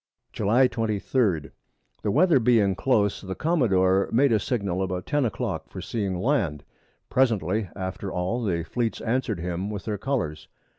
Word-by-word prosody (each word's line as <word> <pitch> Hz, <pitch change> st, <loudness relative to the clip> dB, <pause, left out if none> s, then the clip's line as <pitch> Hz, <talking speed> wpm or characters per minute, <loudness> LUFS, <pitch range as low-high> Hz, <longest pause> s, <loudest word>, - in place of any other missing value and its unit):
July 115 Hz, +6 st, +3 dB
23. 110 Hz, -, 0 dB, 0.5 s
The 105 Hz, -, -1 dB
Weather 160 Hz, -, +4 dB
being 110 Hz, -5 st, +3 dB
close, 105 Hz, -1 st, +1 dB
the 95 Hz, -1 st, -5 dB
Commadore 100 Hz, -, +2 dB
made 135 Hz, +3 st, +4 dB
a 110 Hz, -, +4 dB
Signal 100 Hz, -5 st, -1 dB
about 90 Hz, -1 st, -2 dB
10 145 Hz, -2 st, +1 dB
a -, -, +2 dB
Clock -, -, -4 dB
for -, -, -8 dB
seeing 100 Hz, -5 st, -2 dB
Land; 95 Hz, -, 0 dB, 0.5 s
presently 110 Hz, -6 st, +1 dB
after 95 Hz, 0 st, -4 dB
all 95 Hz, +7 st, -1 dB
the 85 Hz, -6 st, 0 dB
Fleet 115 Hz, +7 st, -2 dB
answer'd 115 Hz, -4 st, -1 dB
him 90 Hz, +3 st, -3 dB
with 105 Hz, -2 st, -5 dB
their 105 Hz, -3 st, -3 dB
Colours. 95 Hz, -, -2 dB
105 Hz, 155 wpm, -25 LUFS, 95-125 Hz, 0.5 s, Weather